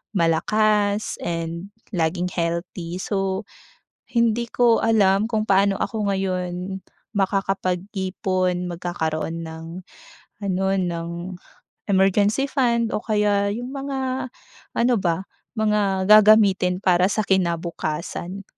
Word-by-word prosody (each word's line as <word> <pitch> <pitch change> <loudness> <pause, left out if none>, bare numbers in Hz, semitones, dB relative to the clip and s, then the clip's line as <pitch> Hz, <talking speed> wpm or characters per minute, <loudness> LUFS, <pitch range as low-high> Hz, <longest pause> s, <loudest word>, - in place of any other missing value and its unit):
malakas 205 +5 +1
and 170 +3 -4 0.2
laging 175 +1 0
healthy. 170 0 -3
So, 195 0 -2 0.6
hindi 235 0 +1
ko 240 -2 +4
alam 210 -2 +3
kung 215 -2 0
paano 195 0 +3
ako 210 -3 -1
ngayon 185 0 -3 0.3
makakapag-ipon, 185 -1 -1
magkakaroon 165 -1 -3
ng 160 0 -8 0.8
ano, 190 -1 -1
ng 170 -3 -2 0.8
emergency 200 +7 +3
fund 235 -4 +1
o - - +1
kaya 205 -2 +2
'yung 245 +4 -5
mga 265 -2 -3 0.5
ano 245 +1 +3
ba, 180 +1 -1 0.3
mga 205 -3 +1
gagamitin 210 -4 +6
para 180 0 +4
sa 215 - +1
kinabukasan. 170 0 -2
195 Hz, 95 wpm, -23 LUFS, 180-215 Hz, 0.8 s, gagamitin